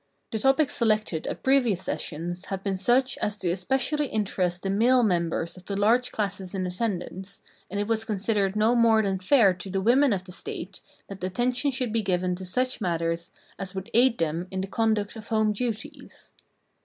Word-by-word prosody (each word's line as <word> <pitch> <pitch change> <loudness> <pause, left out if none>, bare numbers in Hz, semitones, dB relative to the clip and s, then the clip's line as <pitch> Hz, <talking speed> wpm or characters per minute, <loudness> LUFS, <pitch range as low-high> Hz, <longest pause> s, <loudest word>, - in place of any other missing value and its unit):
The 220 - -2
topics 270 +4 +3
selected 215 -8 +1
at - - -5
previous 245 -9 +3
sessions 175 +2 -4
had 195 -1 -5
been 195 -1 -1
such 245 +7 +2
as 210 0 -1
to 180 -4 -1
especially 265 - 0
interest 185 -5 -1
the 195 - -1
male 240 +5 +4
members 170 -4 0
of 185 -1 -14
the 200 -1 -3
large 240 +4 +3
classes 195 -2 -3
in 185 -1 -1
attendance, 190 -1 -4 0.3
and 200 - -3
it 205 - 0
was 220 -1 +1
considered 205 -2 0
no 215 +3 +3
more 230 -2 +4
than 195 -2 -1
fair 195 0 +5
to 180 +2 -9
the 195 +1 -1
women 250 +7 +4
of 190 -3 -1
the 185 - -12
State 180 +1 -7 0.3
that 195 -2 -9
attention 245 +8 0
should 255 -3 -1
be 230 - +2
given 185 -2 0
to 185 +1 -6
such 255 +7 -1
matters 165 -1 -1 0.3
as 195 0 -5
would 190 0 -6
aid 240 +1 +4
them 165 +2 -1
in 190 0 -3
the 190 - -4
conduct 215 0 0
of 220 -1 -9
home 215 -2 +2
duties. 225 0 -5
205 Hz, 190 wpm, -26 LUFS, 185-230 Hz, 0.3 s, fair